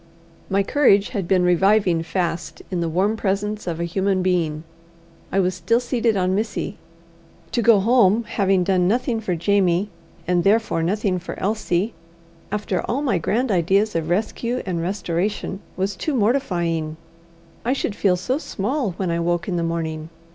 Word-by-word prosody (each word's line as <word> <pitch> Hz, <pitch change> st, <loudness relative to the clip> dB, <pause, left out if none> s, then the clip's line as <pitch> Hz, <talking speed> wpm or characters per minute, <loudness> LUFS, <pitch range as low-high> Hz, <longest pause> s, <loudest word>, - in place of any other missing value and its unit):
My 195 Hz, +1 st, +2 dB
courage 205 Hz, -5 st, +3 dB
had 195 Hz, -4 st, -3 dB
been 185 Hz, -1 st, +3 dB
reviving 180 Hz, 0 st, +3 dB
fast 170 Hz, -1 st, -3 dB
in 180 Hz, -2 st, -1 dB
the 165 Hz, -, -1 dB
warm 190 Hz, +6 st, +1 dB
presence 210 Hz, 0 st, -2 dB
of 170 Hz, -1 st, -3 dB
a -, -, -1 dB
human 190 Hz, +2 st, 0 dB
being. 165 Hz, -4 st, 0 dB, 0.7 s
I 195 Hz, -, +2 dB
was 185 Hz, -1 st, +2 dB
still 230 Hz, +6 st, +1 dB
seated 240 Hz, -3 st, 0 dB
on 185 Hz, 0 st, +1 dB
Missy. 210 Hz, 0 st, -2 dB, 0.7 s
To 235 Hz, -, +1 dB
go 230 Hz, -3 st, +6 dB
home 225 Hz, 0 st, +4 dB
having 195 Hz, -4 st, +1 dB
done 180 Hz, -1 st, +2 dB
nothing 235 Hz, +2 st, 0 dB
for 185 Hz, -5 st, -1 dB
Jamie, 190 Hz, +2 st, +1 dB, 0.4 s
and 175 Hz, -1 st, +2 dB
therefore 210 Hz, -4 st, +2 dB
nothing 190 Hz, +2 st, 0 dB
for 180 Hz, -, -7 dB
Elsie, 210 Hz, 0 st, 0 dB, 0.6 s
after 205 Hz, -3 st, -1 dB
all 270 Hz, +5 st, -2 dB
my 230 Hz, -11 st, +1 dB
grand 235 Hz, +8 st, 0 dB
ideas 195 Hz, +4 st, +2 dB
of 165 Hz, -1 st, -1 dB
rescue 230 Hz, +6 st, -1 dB
and 175 Hz, -3 st, -2 dB
restoration, 190 Hz, +1 st, -2 dB, 0.2 s
was 190 Hz, +1 st, -1 dB
too 305 Hz, +6 st, -2 dB
mortifying. 175 Hz, -, 0 dB, 0.7 s
I 245 Hz, -, +1 dB
should 240 Hz, -6 st, -2 dB
feel 195 Hz, -3 st, +2 dB
so 250 Hz, +10 st, -1 dB
small 245 Hz, -, -2 dB
when 180 Hz, 0 st, -2 dB
I 170 Hz, -, 0 dB
woke 175 Hz, 0 st, 0 dB
in 185 Hz, -, -1 dB
the 170 Hz, -, 0 dB
morning! 160 Hz, -1 st, -3 dB
195 Hz, 165 wpm, -22 LUFS, 175-215 Hz, 0.7 s, go